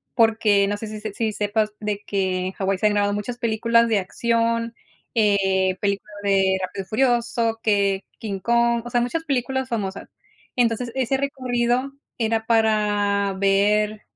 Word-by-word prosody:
porque, 220 -3 +3
no 205 - -1
sé 220 - -6
si 215 0 -7
si 215 -1 -6
si 220 +1 -1
sepas 210 +1 -1
de 210 -1 -3
que 185 -2 -1
en - - -3
Hawái 195 0 -1
se 215 - +2
han - - +2
grabado 205 0 +1
muchas 210 +4 -4
películas 230 0 +2
de 220 -3 +2
acción, 230 +3 -1 0.4
eh, 190 -3 +2
películas 200 +1 -2
de 195 -1 +3
Rápido 185 +1 -4
y - - -19
furioso, 235 -1 +1
que 200 -2 +1 0.2
King 200 -3 -4
Kong, 235 +2 +2
o - - -5
sea, 240 - +1
muchas 320 +7 -2
películas 265 -2 -1
famosas. 200 -4 -4 0.5
Entonces, 235 0 +1
ese 265 0 0
recorrido 255 -1 -1 0.2
era 225 -1 0
para 210 -3 +2
ver, 210 +2 +2
215 Hz, 160 wpm, -23 LUFS, 200-235 Hz, 0.5 s, porque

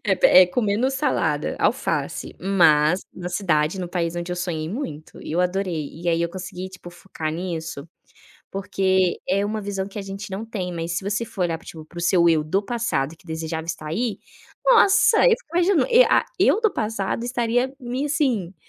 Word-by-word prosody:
É - - +3
pé - - +7
é, - - +4
comendo 215 +5 0
salada, 275 +2 0
alface, - - -1
mas 170 -3 +4
na 180 -1 -6
cidade, 170 -2 0
no 180 - -3
país 170 -2 -2
onde 175 +1 -4
eu - - -4
sonhei 170 -3 -3
muito 165 - -6
e - - -7
eu 170 - +1
adorei. 180 -4 -1
E 175 +2 -5
aí 165 0 +2
eu 170 - 0
consegui, 185 0 -6
tipo, 185 -1 -11
focar 175 -3 -6
nisso 165 -3 -5 0.6
porque 190 -1 0
é 195 +2 +2
uma 215 +1 -2
visão 195 -2 -3
que 200 - -8
a - - -4
gente 195 +1 -7
não 195 +3 -4
tem, 190 -5 -4
mas 165 0 -4
se 180 - -2
você 205 +3 -1
for 200 -4 -4
olhar, 165 -2 0
tipo, 160 -1 -11
para 175 - -12
o - - -3
seu 170 0 +4
eu 160 -2 +3
do 190 +7 0
passado 195 - -2
que 180 - -24
desejava 160 0 -4
estar 155 -2 -5
aí, 210 +5 -2 0.5
nossa, 450 -2 +5
eu - - +7
fico 450 -8 -2
imagina, 355 0 +3
e - - +7
a - - +3
eu 430 - +4
do 440 -2 +2
passado 215 +1 -2
estaria 245 +1 0
me, 250 +2 -3
assim, 250 - 0
185 Hz, 200 wpm, -23 LUFS, 170-225 Hz, 0.6 s, pé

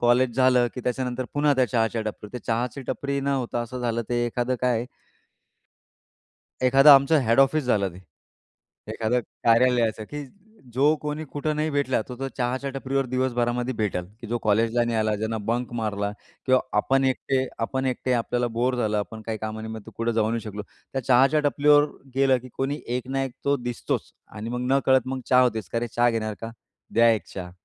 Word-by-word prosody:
College 120 0 +3
झालं, 130 -2 +4
की 125 - -5
त्याच्यानंतर 125 0 -2
पुन्हा 145 0 +3
त्या 130 -1 +3
चहाच्या 115 0 0
टपरी, 105 -1 -6
ते 125 - -4
चहाची 120 +3 -1
टपरी 140 0 -2
न 135 - -5
होता 130 -3 -1
असं 125 +2 -6
झालं, 120 -1 -1
ते 120 0 +1
एखादं 120 +2 -1
काय 120 -1 +1 1.8
एखादा 135 +3 +8
आमचं 140 +3 +5
हेड 115 +2 +3
ऑफिस 135 +2 +3
झालं 105 -6 +2
ते. 90 - -12 0.9
एखादं 115 +2 0 0.2
कार्यालयाचं, 115 -2 +3
की 145 +6 -7 0.5
जो 145 +4 +4
कोणी 150 +1 -3
कुठं 150 +1 -2
नाही 155 +1 0
भेटला 140 -4 +1
तर 125 - -6
तो, 135 - -3
चहाच्या 130 +2 -1
टपरीवर 135 0 -2
दिवसभरामध्ये 125 0 -1
भेटेल, 105 -5 -1 0.2
की 115 - -8
जो 120 +1 -1
कॉलेजला 115 +3 +2
नाही 115 -1 -1
आला, 110 0 +1
ज्यानं 110 0 -3
बंक 120 +2 -1
मारला 100 -2 -2 0.4
किंवा 130 -1 +4 0.2
आपण 135 +5 +2
एकटे 130 0 0 0.2
आपण 130 +2 -2
एकटे 130 0 -1
आपल्याला 120 +1 0
बोर 125 +2 +1
झालं, 110 -3 0
आपण 110 +2 -5
काही 110 -1 -3
काम 110 0 -5
निमित्त 110 -1 -7
कुठे 115 0 0
जाऊ 110 -1 +1
नाही 115 0 -1
शकलो. 105 -1 -6 0.3
त्या 135 - -2
चहाच्या 135 +5 +4
टपरीवर 145 0 +5 0.3
गेलं, 135 -1 +4
की 130 +1 -12
कोणी 140 +3 -2 0.2
एक 125 0 -6
ना 135 0 -1
एक 135 - -6
तो 140 0 +3
दिसतोच. 120 -1 -4 0.2
आणि 110 +2 -6
मग 125 0 -3
नकळत 130 -2 +3
मग 130 0 -3
चहा 125 -1 +5
होतेच. 110 -7 0
का, 115 - -1
"अरे 120 0 -3
चहा 120 0 +4
घेणार 110 -2 -2
का? 115 - -5 0.4
द्या 115 0 +5
एक 110 - -3
चहा." 90 -2 -6
125 Hz, 190 wpm, -25 LUFS, 115-135 Hz, 1.8 s, एखादा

